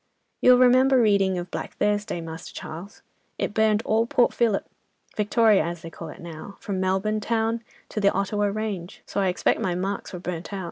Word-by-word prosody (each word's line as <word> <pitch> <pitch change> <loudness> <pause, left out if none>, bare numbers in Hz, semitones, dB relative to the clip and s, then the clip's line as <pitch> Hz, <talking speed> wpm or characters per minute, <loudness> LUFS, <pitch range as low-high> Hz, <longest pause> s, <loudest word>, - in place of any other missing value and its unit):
"'You'll 250 0 +7
remember 255 +1 +5
reading 200 -4 +3
of 175 0 -5
Black - - -5
Thursday, 205 -3 0
Master 160 0 -8
Charles? 175 +6 -9 0.3
it - - -2
burned 220 0 +2
all 225 +1 +2
Port 250 -2 +3
Phillip, 225 -4 +1 0.5
Victoria 215 0 +4
as 170 -1 -5
they 165 - -8
call 165 0 -8
it - - -11
now, 170 +3 -9
from 195 -2 -3
Melbourne 190 +3 0
town 225 +1 0 0.3
to 210 - -3
the 200 - +4
Ottawa 205 +1 0
range. 200 -4 -4
So 200 - -2
I 195 - +2
expect 180 - +1
my 180 -2 0
marks 195 +3 -3
were 180 - -6
burnt 175 0 -5
out. 200 - -4
200 Hz, 190 wpm, -25 LUFS, 180-220 Hz, 0.5 s, You'll